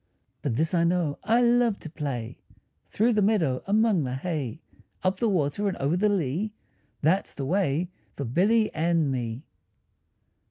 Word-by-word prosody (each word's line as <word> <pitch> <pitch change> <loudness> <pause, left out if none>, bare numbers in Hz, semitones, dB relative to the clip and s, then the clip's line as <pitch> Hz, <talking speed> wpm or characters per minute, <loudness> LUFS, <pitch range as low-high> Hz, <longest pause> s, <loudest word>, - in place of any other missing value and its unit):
But 125 -6 -1
this 160 +6 0
I 170 -1 +3
know, 170 -4 0
I 230 +4 +3
love 240 -3 +3
to - - -7
play 130 -7 -4 0.5
Through 230 +3 +2
the 210 - +2
meadow, 180 -11 +2
among 210 -4 +3
the 125 -1 -3
hay; 150 -3 -3 0.4
Up 185 0 +1
the 230 +3 +1
water 180 +2 0
and 195 - -2
over 140 +5 0
the 210 +4 +2
lea, 190 +2 -1 0.5
That's 180 +6 +1
the 135 - -4
way 175 0 0 0.2
for 140 - -4
Billy 210 - +2
and 160 -2 +1
me. 120 0 -3
170 Hz, 160 wpm, -26 LUFS, 140-205 Hz, 0.5 s, I